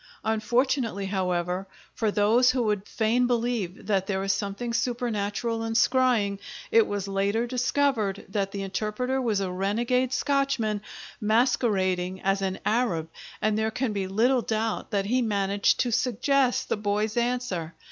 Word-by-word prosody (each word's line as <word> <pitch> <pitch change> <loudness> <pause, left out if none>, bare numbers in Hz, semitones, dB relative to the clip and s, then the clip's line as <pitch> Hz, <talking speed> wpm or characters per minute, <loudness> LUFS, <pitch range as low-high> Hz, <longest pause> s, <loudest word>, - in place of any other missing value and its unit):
Unfortunately, 225 0 0
however, 180 -1 -1 0.3
for 220 - 0
those 220 +5 +4
who 255 -1 +1
would 210 -2 -1
fain 235 +3 +1
believe 235 -6 -1
that 195 -2 0
there 190 -1 -1
is 195 0 +2
something 200 +4 -3
supernatural 230 -2 -1
in 225 0 -2
scrying, 235 -5 +2 0.3
it 225 -1 +5
was 200 -1 -3
later 200 +4 0
discovered 245 -4 0
that 195 0 -2
the 200 0 -4
interpreter 215 +7 -2
was 220 -5 +1
a 190 -2 -2
renegade 235 +7 0
Scotchman, 270 -8 0 0.4
masquerading 195 -5 +1
as 195 +1 +1
an 190 -1 -1
Arab, 210 -8 0 0.3
and 215 -1 +2
there 220 +1 +1
can 235 0 -2
be 195 -2 -2
little 240 +6 +2
doubt 220 -1 -2
that 200 -3 0
he 250 +5 +1
managed 200 -3 +1
to 245 - 0
suggest 250 +2 +1
the - - 0
boy's 210 +1 -1
answer. 235 -9 -1
215 Hz, 145 wpm, -26 LUFS, 195-245 Hz, 0.4 s, it